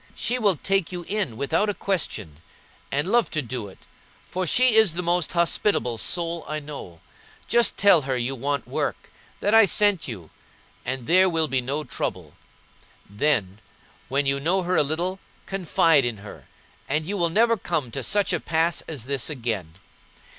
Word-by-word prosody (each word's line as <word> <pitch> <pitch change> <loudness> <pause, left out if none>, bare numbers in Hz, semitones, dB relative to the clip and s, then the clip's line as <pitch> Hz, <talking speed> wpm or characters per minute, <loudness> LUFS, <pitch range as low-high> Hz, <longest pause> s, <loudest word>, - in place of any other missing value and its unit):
She 250 +1 -1
will 205 -5 +3
take 195 +3 -1
you 175 -1 -5
in 190 - -3
without 140 +10 0
a 205 - -2
question, 115 - -3 0.5
and 145 +4 0
love 240 0 +3
to 155 - -1
do 120 -3 -5
it, 95 - -14 0.5
for 185 0 -3
she 250 +7 +4
is 220 -6 +5
the 180 +1 -3
most 175 0 0
hospitable 170 - +1
soul 170 +2 -1
I 155 - -3
know. 145 - -9 0.5
Just 235 0 +3
tell 200 -5 +6
her 135 -2 -2
you 125 +2 -1
want 140 +1 -3
work, - - -3 0.3
that 205 - +1
I 225 -1 +8
sent 200 -1 +2
you, 95 - -8 0.5
and 130 -2 -4
there 185 +5 +5
will 165 -2 +2
be 135 -3 +1
no 140 +5 -3
trouble. 130 - -5 0.7
Then, 105 -4 0 0.5
when 140 +2 +1
you 135 0 +1
know 180 +6 +1
her 180 +1 0
a - - +5
little, 170 +6 -2 0.3
confide 165 -5 +3
in 120 -3 -2
her, - - -12 0.4
and 150 +3 0
you 200 +5 -3
will 170 -3 +1
never 230 +6 +3
come 155 - -3
to 135 - -4
such 205 +9 +1
a - - +1
pass 165 +1 0
as 145 -8 -5
this 135 +2 -1
again. 110 - -4
160 Hz, 175 wpm, -24 LUFS, 130-185 Hz, 0.7 s, I